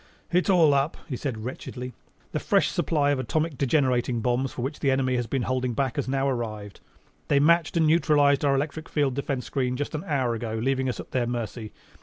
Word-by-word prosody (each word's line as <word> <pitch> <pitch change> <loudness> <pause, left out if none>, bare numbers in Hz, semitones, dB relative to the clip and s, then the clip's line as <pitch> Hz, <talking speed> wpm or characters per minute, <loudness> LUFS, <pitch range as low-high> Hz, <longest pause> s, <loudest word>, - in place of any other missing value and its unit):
"It's 180 +3 +2
all 165 -6 +5
up," 140 +3 +1
he 135 - -3
said 115 -4 -4
wretchedly. 125 0 -6 0.4
"The - - -1
fresh - - +2
supply 145 -3 +1
of 140 - 0
atomic 155 +4 -1
degenerating 130 -3 +1
bombs, 125 +3 0
for 120 - -5
which 140 +4 -4
the 140 - +1
enemy 130 -1 +1
has 120 -2 -1
been 135 -1 -1
holding 130 -1 -1
back, 135 +2 -1
has 140 - -1
now 135 +1 0
arrived. 110 -6 -4 0.5
They 140 - +3
matched 170 +3 +3
and 160 - +4
neutralized 150 -3 +4
our 140 -1 +3
electric 150 +3 -3
field 145 -3 +1
defense 135 -2 -3
screen 125 -2 -1
just 145 +3 -3
an 155 - -3
hour 130 -5 +1
ago, 115 -1 -4
leaving 130 +2 0
us 120 - -4
at - - -8
their 125 -2 0
mercy. 115 -2 -4
135 Hz, 210 wpm, -26 LUFS, 125-145 Hz, 0.5 s, all